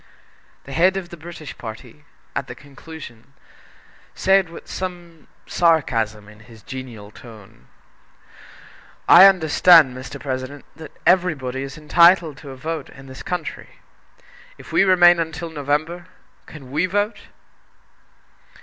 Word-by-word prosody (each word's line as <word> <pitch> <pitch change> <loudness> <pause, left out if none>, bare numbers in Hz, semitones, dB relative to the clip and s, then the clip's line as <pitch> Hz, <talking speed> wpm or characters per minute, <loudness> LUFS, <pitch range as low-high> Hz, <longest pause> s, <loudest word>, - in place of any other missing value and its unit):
The 135 - -12
head 185 +5 +3
of 180 -3 -6
the 170 - -9
British 165 -2 -10
party, 120 +5 -10 0.3
at 135 -1 -3
the 125 - -9
conclusion, 140 -3 -13 0.8
said 190 -2 +2
with 170 - -12
some 175 -3 -8 0.2
sarcasm 115 -11 0
in 105 0 -16
his 110 0 -17
genial 120 -6 -9
tone: 105 - -16 1.4
"I 185 +3 +9
understand, 165 -5 +5
Mr. 130 +2 -9
President, 130 +1 -6
that 160 -1 -13
everybody 155 -8 +1
is 135 +1 -7
entitled 170 0 +4
to 140 - -12
a 135 - -9
vote 155 +1 -5
in 135 - -14
this 130 0 -11
country. 180 - -6 0.8
If - - -14
we - - +4
remain 175 -2 +5
until 165 0 -4
November, 155 +4 -3 0.4
can 135 -5 -12
we 160 +6 0
vote?" 205 +4 -2
150 Hz, 125 wpm, -21 LUFS, 130-175 Hz, 1.4 s, I